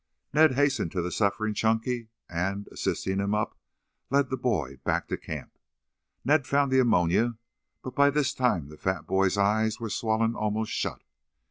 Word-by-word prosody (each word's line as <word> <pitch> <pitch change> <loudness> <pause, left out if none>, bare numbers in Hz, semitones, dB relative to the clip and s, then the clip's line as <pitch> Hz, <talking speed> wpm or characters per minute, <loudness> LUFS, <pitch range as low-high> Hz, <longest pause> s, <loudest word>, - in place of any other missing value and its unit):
Ned 155 -3 +5
hastened 140 - +1
to 90 - -1
the 90 - -3
suffering 105 +2 0
Chunky 115 +2 0 0.2
and, 95 +4 -2
assisting 95 +1 -2
him 100 +1 0
up, 105 - -1 0.5
led 140 -1 +2
the - - +1
boy 80 - -1
back - - 0
to - - -4
the - - -3
camp. - - -7 0.7
Ned 140 0 +3
found 140 -1 +2
the 130 - +4
ammonia, 110 0 +3 0.5
but 130 - -6
by 140 +2 +5
this 145 -1 +1
time 90 - 0
the 75 - -12
fat 95 +2 -2
boy's 95 +1 +2
eyes 110 +2 +2
were 115 -2 -4
swollen 115 0 +1
almost 110 0 -2
shut. - - -3
110 Hz, 170 wpm, -27 LUFS, 95-130 Hz, 0.7 s, Ned